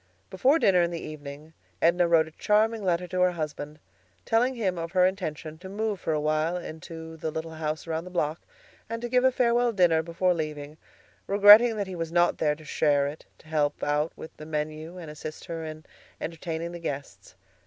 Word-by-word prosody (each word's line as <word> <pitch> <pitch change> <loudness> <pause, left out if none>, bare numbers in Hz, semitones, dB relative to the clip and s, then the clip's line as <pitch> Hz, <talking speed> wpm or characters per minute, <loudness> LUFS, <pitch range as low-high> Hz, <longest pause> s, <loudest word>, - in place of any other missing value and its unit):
Before 260 - +3
dinner 190 - +4
in 170 - +2
the 170 -1 -4
evening 150 +1 -9 0.3
Edna 170 +1 +3
wrote 165 -2 +4
a - - -12
charming 215 +4 +1
letter 180 -1 +1
to 180 +1 -1
her 180 0 +4
husband, 150 -2 -5 0.5
telling 245 +3 +2
him 190 -7 -1
of 165 +1 -5
her 180 -1 +5
intention 160 -4 -3
to 190 +1 -9
move 210 0 -2
for 160 - -2
a 155 - +1
while 155 +3 0
into 160 -1 -8
the 160 - -3
little 160 +1 -5
house 155 -1 -4
around 165 0 -3
the - - -8
block, 160 -3 -1 0.5
and 230 0 -3
to - - -1
give 250 +1 +3
a 260 - +5
farewell 240 -1 +2
dinner 175 -6 +3
before 170 +2 +1
leaving, 150 -2 -5 0.5
regretting 205 +4 +8
that 205 - -1
he 185 -1 -7
was 165 -1 -4
not 175 0 +2
there 150 -1 +2
to 155 0 -15
share 145 -2 +2
it, 145 +2 -7
to - - -20
help 150 -2 0
out 150 +2 +1
with 160 - -10
the 155 - -9
menu 155 +2 -4
and 165 -4 -8
assist 155 +1 -8
her 165 -1 -5
in 155 0 -8 0.3
entertaining 165 0 -4
the 175 - -7
guests. 145 -4 -6
165 Hz, 205 wpm, -27 LUFS, 155-185 Hz, 0.5 s, regretting